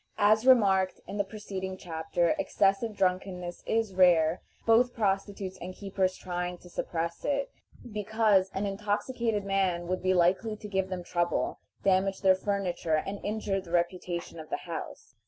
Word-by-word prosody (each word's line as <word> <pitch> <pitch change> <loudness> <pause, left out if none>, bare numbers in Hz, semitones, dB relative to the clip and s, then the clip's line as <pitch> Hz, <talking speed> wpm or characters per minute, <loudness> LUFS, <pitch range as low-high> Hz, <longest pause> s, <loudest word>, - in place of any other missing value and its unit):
As 215 +3 +4
remarked 195 -7 +5
in 205 - -6
the 200 - +2
preceding 190 -2 -6
chapter, 165 0 -1
excessive 200 +3 +1
drunkenness 180 -1 -1
is 225 -3 0
rare, 175 -2 +4 0.2
both 240 +2 +4
prostitutes 195 -2 -1
and 185 +1 -6
keepers 190 -2 -1
trying 180 0 -3
to 180 0 -16
suppress 170 0 -3
it, 280 -1 -1 0.4
because 210 -2 +2
an 195 +2 -1
intoxicated 210 +2 -1
man 190 -3 +1
would 185 +1 -2
be 185 0 +2
likely 185 +5 +2
to 210 - -9
give 190 -2 -1
them 185 -1 -4
trouble, 175 0 -1 0.2
damage 190 0 +2
their 190 -1 +6
furniture, 185 -4 -1
and 195 +5 -4
injure 205 -2 -1
the 180 - -14
reputation 175 -1 -2
of 155 - -9
the - - -4
house. 165 -5 -7
190 Hz, 155 wpm, -29 LUFS, 180-205 Hz, 0.4 s, their